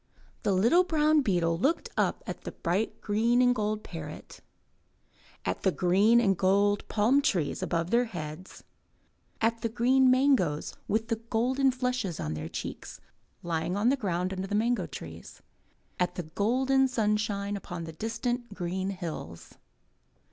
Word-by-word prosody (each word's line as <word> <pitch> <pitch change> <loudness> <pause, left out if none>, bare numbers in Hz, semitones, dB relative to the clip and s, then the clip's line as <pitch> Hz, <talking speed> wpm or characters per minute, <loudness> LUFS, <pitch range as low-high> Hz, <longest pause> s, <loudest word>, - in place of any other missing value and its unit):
The - - +1
little 230 - +4
brown 310 -3 +3
beetle 170 -7 +1
looked 280 - +1
up - - 0
at - - -6
the - - -7
bright 185 +6 -2
green 225 +4 +2
and 250 0 +5
gold 215 -2 -2
parrot, 155 -3 -9 1.0
at 90 - -2
the 190 - +2
green 195 +7 +4
and 195 -5 +3
gold 200 +2 +2
palm 230 +7 +3
trees 175 - 0
above 170 +1 -1
their 240 +1 +4
heads, 170 -3 -8 0.8
at 230 0 +1
the 230 - -1
green 255 +3 +3
mangoes 255 - +2
with 225 +2 0 0.2
golden 260 +4 +2
flushes 250 -8 -2
on 75 - -3
their 80 +1 -5
cheeks, - - -7 0.4
lying 170 +2 -1
on 215 +4 +3
the 275 - +3
ground 185 -6 -2
under 190 0 -4
the 205 - -2
mango 220 -4 +1
trees, 80 - -10 0.6
at 180 0 0
the 180 - -3
golden 255 - +2
sunshine 210 -4 0
upon 175 -4 -6
the 160 -1 -7
distant 235 +4 -3
green 185 +1 -2
hills. 165 - -7
205 Hz, 150 wpm, -28 LUFS, 175-245 Hz, 1.0 s, and